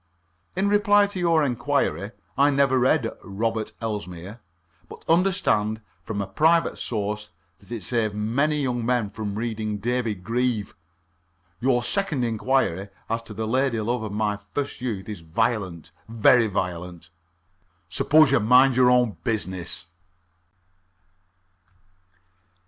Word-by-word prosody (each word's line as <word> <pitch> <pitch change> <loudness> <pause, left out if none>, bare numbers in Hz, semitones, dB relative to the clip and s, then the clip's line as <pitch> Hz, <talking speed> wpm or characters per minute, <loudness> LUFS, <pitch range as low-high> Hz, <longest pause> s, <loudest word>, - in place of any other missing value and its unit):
"In 190 +2 +1
reply 205 0 +4
to 200 -2 -5
your 165 -3 +3
inquiry, 125 -5 0 0.3
I 140 +2 +4
never 135 -2 +3
read 125 -1 +2
'Robert 110 +2 -2
Elsmere,' 105 -2 -5 0.5
but - - -12
understand 165 - +2 0.2
from 100 0 -3
a - - -4
private 160 - +2
source 105 -1 -3 0.3
that 100 - -20
it 115 -5 -5
saved 110 -1 0
many 140 +8 0
young 120 -2 -1
men 120 -4 0
from 105 -3 -5
reading 110 -1 -3
'David 115 -3 -2
Grieve.' 115 -1 -1 0.9
Your 120 0 +2
second 165 -6 0
inquiry 110 -5 0 0.2
as 115 0 0
to 110 -2 -11
the 110 +2 -3
lady 130 +1 +1
love 120 +3 -1
of 110 -2 -5
my 105 0 -1 0.2
first 145 -3 -3
youth 110 -7 -4
is 105 -4 -6
violent 90 -2 -2 0.2
very 115 +1 +4
violent. 90 -3 -4 0.8
Suppose 155 - +4
you 135 - +4
mind 125 +4 +5
your 125 0 +5
own 125 -4 +3
business." 95 -7 -3
115 Hz, 125 wpm, -24 LUFS, 105-130 Hz, 0.9 s, mind